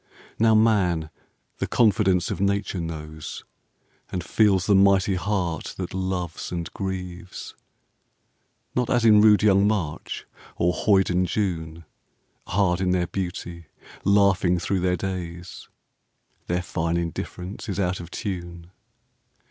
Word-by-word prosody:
Now 110 0 +5
Man 90 -8 +2 0.5
the - - -1
confidence 95 -5 +2
of - - -3
Nature 100 -1 0
knows, 80 -2 -6 0.7
And 90 -2 -3
feels 95 -2 +3
the 105 - +3
mighty 100 0 +4
heart 90 -3 -2
that 90 -1 -5
loves 95 -3 -3
and 85 -1 -4
grieves. 90 -2 -6 1.2
Not 125 -1 0
as 120 -3 +2
in 105 -2 +7
rude 105 -1 +6
young 100 -1 +5
March 90 -8 -3 0.3
or 90 +1 +1
hoyden 90 -2 +2
June, 85 -4 -3 0.6
Hard 95 -2 +1
in 95 - +1
their 90 -1 +2
beauty, 85 -2 -5 0.4
laughing 100 -3 +3
thro' 95 +2 -1
their 90 0 +1
days; 90 -1 -6 0.8
Their 90 +1 -1
fine 85 -1 -1
indifference 90 +5 -5
is 95 0 -3
out 95 -1 0
of 85 -1 -8
tune. 85 -4 -6
90 Hz, 125 wpm, -24 LUFS, 85-100 Hz, 1.2 s, in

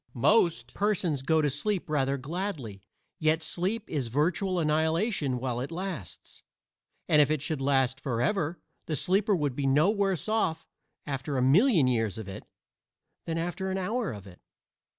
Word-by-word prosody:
Most 170 - +2
persons 185 -8 0
go 160 +3 +2
to 145 - +3
sleep 185 +7 -1
rather 140 -3 0
gladly, 140 - -5 0.4
yet 155 0 +2
sleep 190 +7 -2
is 140 -6 -2
virtual 170 - 0
annihilation 160 - +1
while 125 -1 -2
it 135 +6 -4
lasts; 175 - -6 0.7
and 150 - +5
if 145 - +3
it 155 -1 +1
should 155 -4 -2
last 135 -1 +2
forever 145 - -1 0.3
the 155 - -1
sleeper 195 - +2
would 145 -6 -1
be 140 0 -1
no 150 +8 +4
worse 195 -6 0
off 215 -7 0 0.4
after 140 0 -3
a - - +1
million 170 - +5
years 115 -5 0
of 110 -3 -7
it 95 - -8 0.8
than 165 0 -2
after 175 +3 -3
an 190 - -1
hour 215 +2 -1
of 100 -3 -9
it. 90 -2 -14
155 Hz, 160 wpm, -28 LUFS, 135-185 Hz, 0.8 s, and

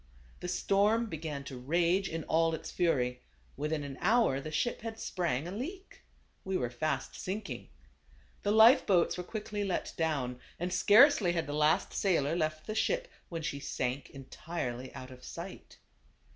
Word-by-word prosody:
The 180 - -5
storm 205 +5 +2
began 155 -7 -5
to 135 -2 -8
rage 170 +8 +1
in 165 -1 -4
all 165 +1 +2
its - - -8
fury; 125 -8 +1 0.3
within 150 +1 -2
an 140 -2 -7
hour 220 - +3
the 155 - -6
ship 165 +10 -1
had 225 0 -5
sprang 165 -7 -1
aleak; 325 - -7 0.4
we 190 0 -1
were 120 -6 -2
fast 135 +1 -2
sinking. 200 +4 -5 0.7
The 205 - -1
life 220 +5 +7
boats 180 -4 +3
were 180 - -4
quickly 210 +1 -4
let 195 -3 -2
down, 140 -7 -1 0.2
and 180 +1 -2
scarcely 205 - +6
had 165 -2 0
the 145 - -5
last 155 +5 +2
sailor 165 -6 +1
left 155 -2 -1
the 215 - -3
ship - - 0 0.2
when 165 -2 -4
she 140 -2 -3
sank 130 0 -3
entirely 130 -2 -5
out 130 0 -8
of 125 0 -13
sight. - - -9
165 Hz, 160 wpm, -31 LUFS, 140-200 Hz, 0.7 s, life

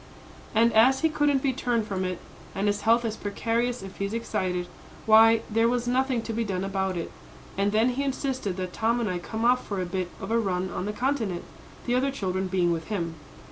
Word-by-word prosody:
"And 230 +2 +4
as 255 +5 +5
he 320 - +3
couldn't 295 -3 +1
be 270 -2 +2
turned 240 -4 0
from 195 -3 -2
it, 185 -1 -2 0.4
and 195 - -1
his 205 0 +1
health 230 +1 +3
is 220 -1 -2
precarious 230 +3 -1
if 195 0 -9
he 200 - -1
is 200 +3 -3
excited, 185 -6 -2 0.4
why, 225 +1 +7
there 225 +1 +2
was 245 0 -1
nothing 255 -1 +1
to 230 - -4
be 230 +1 0
done 190 -3 -2
about 190 -1 -1
it. 170 - -4 0.4
And 200 +1 +1
then 220 +4 +3
he 250 +2 -2
insisted 260 -8 -2
that 185 -1 -4
Tom 230 +2 +1
and 235 - -1
I 180 -2 -2
come 220 +5 -3
off 250 +1 +4
for 200 -2 -3
a 185 - -1
bit 180 0 -3
of 195 - -6
a 230 - +3
run 185 -3 -1
on 180 - -3
the 210 - -1
Continent, 225 -7 -1 0.4
the 245 - 0
other 260 +2 +2
children 190 -7 -2
being 180 -2 +1
with 165 -1 -2
him. 170 -6 -2
220 Hz, 225 wpm, -26 LUFS, 190-245 Hz, 0.4 s, why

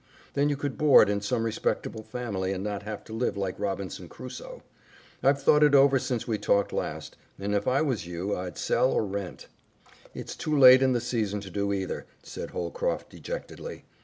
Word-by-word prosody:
Then 145 +1 +2
you 145 - -1
could 140 -1 -4
board 150 -8 +7
in 100 0 -1
some 115 +3 -1
respectable 110 0 -2
family, 110 -4 -3
and 95 0 -4
not 105 -1 -3
have 105 0 -6
to 110 - -10
live 115 -2 -1
like 95 -2 -3
Robinson 100 -2 -4
Crusoe. - - -9 0.6
I've 140 +1 +3
thought 150 +2 +5
it 145 -1 +6
over 135 -1 +6
since 120 -2 -3
we 110 -3 -1
talked 100 0 +1
last, - - -4 0.2
and 100 +1 -3
if 100 0 0
I 135 +4 +3
was 115 - -2
you 90 +4 -3
I'd 90 -1 -6
sell 130 - +2
or - - +1
rent." 100 -2 -5 0.7
"It's - - -6
too 155 -1 -1
late 130 -1 +9
in 130 -1 +3
the 120 - 0
season 110 -4 -1
to 95 -2 -9
do 100 0 -1
either," 95 -2 -3 0.2
said - - -7
Holcroft - - -3
dejectedly. - - -7
110 Hz, 190 wpm, -27 LUFS, 100-135 Hz, 0.7 s, late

